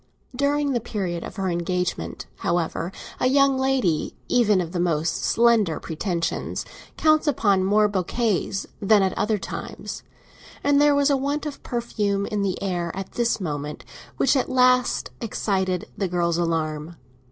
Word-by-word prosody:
During 285 +1 +1
the 245 - +1
period 185 -6 -3
of - - -8
her 195 -2 -2
engagement, 180 0 -2
however, 170 0 -1 0.3
a - - +3
young 275 +1 +4
lady 260 -12 0
even 215 -6 +3
of 170 -2 -3
the 175 - -2
most 160 -2 0
slender 225 -8 +3
pretensions 165 +1 -3 0.3
counts 310 0 +3
upon 200 -9 +3
more 210 +2 +4
bouquets 200 0 -1 0.2
than 205 0 +5
at 190 - 0
other 215 0 +1
times; 195 - -6 0.6
and 285 0 +4
there 295 -1 +5
was 285 0 +3
a 275 - +3
want 285 +3 -2
of 295 -2 -6
perfume 210 -4 -1
in 210 0 -2
the 195 -2 -1
air 175 -3 -1
at 195 0 -6
this 235 -2 0
moment 150 -4 -4 0.3
which - - +3
at 260 - +1
last 250 -1 +3
excited 190 -5 -1
the 195 - -1
girl's 170 -1 0
alarm. 160 -1 -2
200 Hz, 150 wpm, -24 LUFS, 175-250 Hz, 0.6 s, than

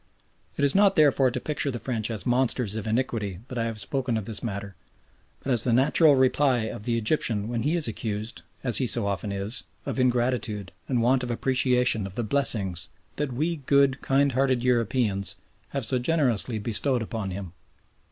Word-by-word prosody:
It 140 - +2
is 140 - +3
not 200 -1 +4
therefore 140 -5 +4
to 125 +1 -4
picture 150 +1 -2
the 125 - -3
French 115 -4 -1
as 110 -5 -4
monsters 125 -3 +1
of 110 0 -4
iniquity 110 -5 -2
that 125 - -4
I 115 - 0
have 115 -2 -4
spoken 120 +3 -1
of 110 - -4
this 110 -1 -4
matter, 100 -3 -5 0.7
but 135 - -2
as 120 -3 +2
the 125 - +1
natural 140 +4 +5
reply 130 -1 +3
of 110 -1 -6
the 120 -1 0
Egyptian 110 -3 +1
when 120 0 -2
he 150 +8 +1
is 165 -6 +2
accused, 110 0 -5 0.2
as 125 -3 +3
he 130 - +1
so 115 0 0
often 100 +1 -2
is, 100 +4 -1 0.2
of - - -3
ingratitude 120 -5 0 0.2
and 125 -3 0
want 125 +2 +3
of 125 - -4
appreciation 125 -3 +2
of 95 - -12
the 120 - -2
blessings 105 - -1 0.3
that 150 -2 -2
we 160 +7 -1
good, 140 -1 +2
kind 140 +1 +2
hearted 130 -1 +1
Europeans 115 -5 0 0.3
have 140 -4 -3
so 130 +2 0
generously 125 -5 0
bestowed 120 +3 -1
upon 110 -3 -4
him. 95 -2 -6
120 Hz, 190 wpm, -26 LUFS, 110-135 Hz, 0.7 s, natural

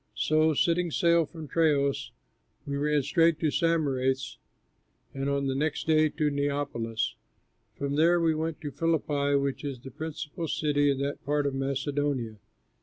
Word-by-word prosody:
So, 155 +4 +2
setting 170 +3 +2
sail 170 0 +3
from 160 -2 -9
Troas, 145 -2 +1 0.6
we 140 - -3
ran 145 0 +1
straight 165 +3 +3
to 155 -3 +2
Samothrace, 135 -6 0 0.7
and 135 +1 -2
on 140 0 0
the 135 - 0
next 150 +3 -1
day 155 -1 +4
to 150 0 0
Neapolis. 140 -6 -2 0.6
From 140 0 -2
there 170 +3 +4
we 165 -1 +2
went 160 0 -3
to 145 - -5
Philippi, 145 -3 0
which 140 0 -1
is 140 -3 -4
the 135 +2 -10
principal 160 +3 -5
city 145 -2 +1
in 140 - +1
that 140 +1 -3
part 145 +1 0
of 140 - 0
Macedonia. 135 -3 -2
145 Hz, 155 wpm, -28 LUFS, 140-160 Hz, 0.7 s, day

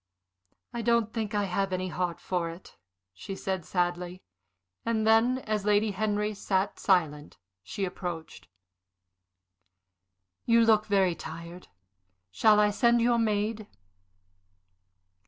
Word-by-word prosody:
"I 235 - -3
don't 235 -1 +1
think 220 -2 -3
I 205 - +1
have 195 0 -1
any 185 0 -2
heart 180 -1 -3
for 175 -2 -2
it," 170 +2 -12 0.4
she 95 - -7
said, 190 -2 -3
sadly; 175 +1 -2 0.6
and 220 -2 0
then, 225 +3 +4
as 215 -5 -2
Lady 210 +1 +2
Henry 210 +1 -1
sat 195 -1 -1
silent, 155 -6 0 0.2
she 195 - -4
approached. 165 - -7 2.0
"You 230 -1 +4
look 215 -1 +3
very 195 -3 +3
tired. 170 +2 -9 0.6
Shall 215 - +4
I 210 0 +4
send 235 +3 +3
your 235 0 +3
maid?" 215 -1 -1
200 Hz, 120 wpm, -28 LUFS, 180-220 Hz, 2.0 s, then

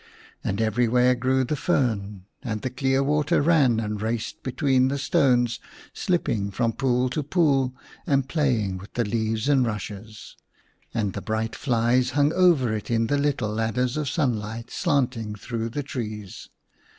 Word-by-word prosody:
And 100 - -2
everywhere 120 +3 +3
grew 130 +2 +1
the 140 +4 -1
fern, 105 - -1 0.2
and 110 -4 -4
the 130 - -2
clear 135 +1 +1
water 150 +1 +2
ran 145 -7 +3
and 105 -2 -3
raced 115 +1 -3
between 130 0 +2
the 140 +1 -1
stones, 120 -3 +2 0.3
slipping 125 - -1
from 115 +3 0
pool 125 -1 +1
to 150 - -1
pool 140 -5 +1 0.3
and 135 -2 +2
play 135 -5 +1
ing 95 -2 -3
with 100 - -13
the 120 - +1
leaves 110 +2 -1
and 140 -3 +4
rushes; 105 -1 -6 0.6
and 105 -5 -1
the - - -5
bright 110 0 -2
flies 125 0 +1
hung 145 +2 +3
over 165 -11 +4
it 105 - -6
in 115 -1 +2
the 145 +5 +1
little 140 -6 0
ladders 115 +4 0
of 150 -3 -1
sunlight 115 -5 -2
slanting 120 -6 0
through 115 +2 -4
the 145 +5 -4
trees. 110 -7 -6
125 Hz, 160 wpm, -25 LUFS, 110-135 Hz, 0.6 s, and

